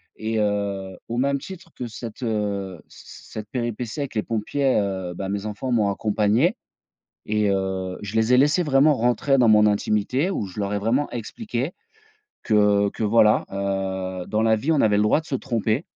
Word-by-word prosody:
et 110 0 -2
heu, 100 -2 -2
au 120 - -3
même 140 +2 +1
titre 185 +2 -10
que 125 - -5
cette, 115 +2 -8
heu, 100 -5 -2
c - - -15 0.3
cette 105 -1 -7
péripétie 120 +1 -3
avec 140 -4 -5
les 105 - 0
pompiers, 130 +5 0
heu, 95 -3 -3
ben 95 +2 -4
mes 100 +1 -3
enfants 110 +5 -4
m'ont 110 -4 +2
accompagné 110 - +1 0.7
et 105 -1 +1
heu, 95 -1 -2
je 105 +1 -6
les 110 +2 +3
ai - - +6
laissés 150 +6 +4
vraiment 145 0 +4
rentrer 125 +3 +2
dans 125 -3 +4
mon 105 0 +6
intimité 105 - +1
où 110 - -2
je 95 +2 -9
leur 100 0 -1
ai 100 - 0
vraiment 120 +8 0
expliqué 130 - -4 0.7
que 105 -1 +3
que - - -6
voilà, 105 0 +4
heu, 95 -2 -3
dans 110 0 0
la 110 0 +4
vie, 140 +9 0
on 150 - +2
avait 105 -2 +3
le 105 - +3
droit 105 +8 +3
de 160 - -16
se - - -4
tromper. 120 +1 -1
110 Hz, 190 wpm, -23 LUFS, 100-125 Hz, 0.7 s, ai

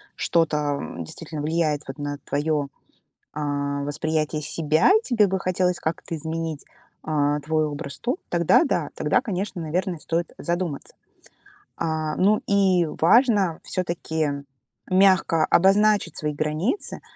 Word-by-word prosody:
что-то, 165 -2 +1 0.2
м, 85 - -6
действительно 155 - -6
влияет 155 -2 0
вот 135 +1 -7
на 145 0 -3
твое, 145 0 0 0.7
а, 145 -1 -2
восприятие 155 +1 -1
себя, 155 - +2
тебе 230 - +3
бы 190 0 -1
хотелось 180 -1 0
как-то 165 +1 -3
изменить, 160 -1 -4 0.4
а, 150 -1 +1
твой 155 +1 0
образ, 145 -1 -6
то 250 +7 -1
тогда, 170 - +4
да, 280 - -1
тогда, - - +1
конечно, 195 -3 -4
наверное, 175 +3 -2
стоит 165 +2 -2
задуматься. 170 -4 -3 0.8
А, 155 -1 -2
ну 205 +3 +3
и 190 -3 +3
важно 200 -3 +4
всё-таки 170 -4 -2 0.6
мягко 185 -4 +4
обозначить 200 -1 +3
свои 150 -1 -2
границы. 155 - -2
160 Hz, 120 wpm, -24 LUFS, 150-185 Hz, 0.8 s, тогда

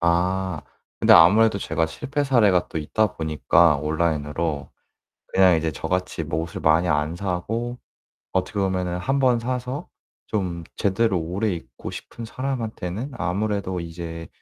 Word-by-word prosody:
아 90 0 +1 0.4
근데 - - +6
아무래도 100 +5 +7
제가 80 -3 0
실패 145 - -3
사례가 105 -9 +3
또 80 - -3
있다 105 +7 0
보니까 80 0 +3
온라인으로 75 -1 -1 0.6
그냥 95 -2 +6
이제 80 0 -1
저같이 90 +2 -2
뭐 80 +1 -2
옷을 85 0 -6
많이 80 +3 +3
안 75 +1 0
사고 110 +7 -3 0.6
어떻게 95 +3 -1
보면은 90 -2 -1
1 135 +9 0
번 125 -3 +3
사서 125 +3 -3 0.4
좀 90 -5 -2
제대로 100 0 +1
오래 90 +7 -1
입고 85 - -7
싶은 115 - -8
사람한테는 115 -2 -4
아무래도 95 -1 -1
이제 85 -1 -7
90 Hz, 290 characters per minute, -23 LUFS, 80-110 Hz, 0.6 s, 아무래도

